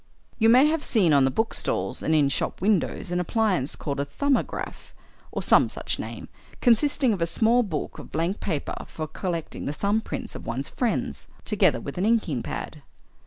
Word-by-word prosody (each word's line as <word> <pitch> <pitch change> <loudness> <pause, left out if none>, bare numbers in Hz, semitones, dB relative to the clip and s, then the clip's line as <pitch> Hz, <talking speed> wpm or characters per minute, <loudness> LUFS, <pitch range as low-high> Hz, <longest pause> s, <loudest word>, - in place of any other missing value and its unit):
"You 225 0 +5
may 255 +4 +7
have 310 0 +1
seen 190 - +3
on 140 -2 +5
the - - +3
bookstalls 225 - -1
and 160 - +1
in 145 -2 +4
shop - - -2
windows 195 -3 0
an 175 - +1
appliance 180 - 0
called 140 -1 -4
a 140 - 0
'Thumbograph,' 275 - -2 0.4
or - - -3
some - - +5
such - - -4
name, - - -6 0.3
consisting 255 0 +3
of 190 - -4
a 165 - +2
small 225 +8 +3
book 175 -10 -4
of - - -11
blank 170 +6 -1
paper 160 -7 -3
for 155 - -5
collecting 170 +1 -4
the 145 - -2
thumb 205 +7 +1
prints - - -5
of - - -8
one's 130 +4 -3
friends, 145 - -2 0.2
together - - +3
with 140 +5 -6
an 195 - +2
inking 200 - +1
pad." 150 - -6
180 Hz, 185 wpm, -25 LUFS, 150-225 Hz, 0.4 s, may